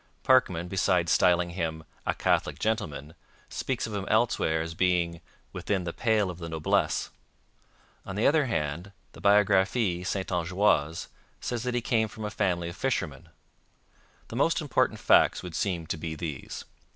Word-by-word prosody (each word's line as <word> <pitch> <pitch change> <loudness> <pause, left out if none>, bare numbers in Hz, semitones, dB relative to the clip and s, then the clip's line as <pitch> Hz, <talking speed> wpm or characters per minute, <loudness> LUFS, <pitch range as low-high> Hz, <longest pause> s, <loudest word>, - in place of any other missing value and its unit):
Parkman, 90 -10 +3
besides 90 -2 +1
styling 90 -1 +3
him 80 -3 -3 0.2
'a - - +1
Catholic 75 - +1
gentleman,' 80 -7 -2 0.4
speaks 130 -2 -2
of 110 - -6
him 100 -2 -3
elsewhere 110 -8 +2
as 80 0 -6
being 85 -1 +1 0.3
'within 95 -3 -1
the 85 -1 -4
pale 110 -5 +1
of 90 - -11
the 85 -1 -6
noblesse.' 80 -1 0 0.9
On 95 - -7
the 105 - +1
other 150 -1 +4
hand, 85 - -3 0.2
the - - -14
Biographie 100 -1 +3
Saintongeoise 90 -3 0 0.3
says 120 -2 -3
that 125 +1 -2
he 120 - +1
came 110 -1 +1
from 110 0 -8
a 105 - -3
family 90 -5 0
of 85 - -8
fishermen. 95 - -2 1.0
The - - -7
most - - +2
important - - +1
facts - - +4
would 90 -2 -7
seem 85 -2 -1
to 80 - -3
be 80 0 -5
these. 75 -4 -6
90 Hz, 155 wpm, -28 LUFS, 85-105 Hz, 1.0 s, other